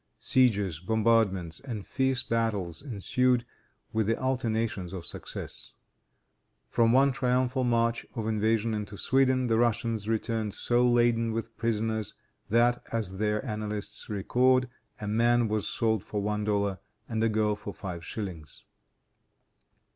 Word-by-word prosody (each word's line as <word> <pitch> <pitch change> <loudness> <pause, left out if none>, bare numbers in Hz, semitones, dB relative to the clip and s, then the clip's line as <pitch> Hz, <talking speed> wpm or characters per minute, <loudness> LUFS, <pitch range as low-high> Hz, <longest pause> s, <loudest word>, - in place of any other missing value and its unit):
Sieges, 105 - +2
bombardments 100 -4 +1
and 115 -7 -6
fierce 130 -1 0
battles 105 -7 -1
ensued, 125 0 +1 0.5
with 110 -2 +1
the 115 - +1
alternations 115 -7 -1
of 90 -3 -6
success. - - -5 1.0
From 115 -1 +4
one 135 +3 +5
triumphal 130 0 +1
march 115 -1 +1
of 115 - -3
invasion 110 +1 +1
into 105 -1 -4
Sweden, 130 +1 +2
the 115 -2 +2
Russians 115 -2 0
returned 110 -1 -1
so 120 +1 +2
laden 120 -1 +3
with 115 0 -4
prisoners, 110 -2 -1 0.3
that, 120 +2 +3
as 100 -5 -2
their 105 +3 0
annalists 105 -2 -3
record, 125 +5 +2 0.3
a 105 - -5
man 120 +2 +3
was 105 -1 -1
sold 110 -3 0
for 105 - -4
one 105 +1 -1
dollar, 100 -2 0 0.3
and 110 -1 -1
a 115 - +3
girl 105 -1 +1
for 105 0 -7
five 90 -4 -7
shillings. 85 -7 -6
110 Hz, 130 wpm, -28 LUFS, 105-120 Hz, 1.0 s, one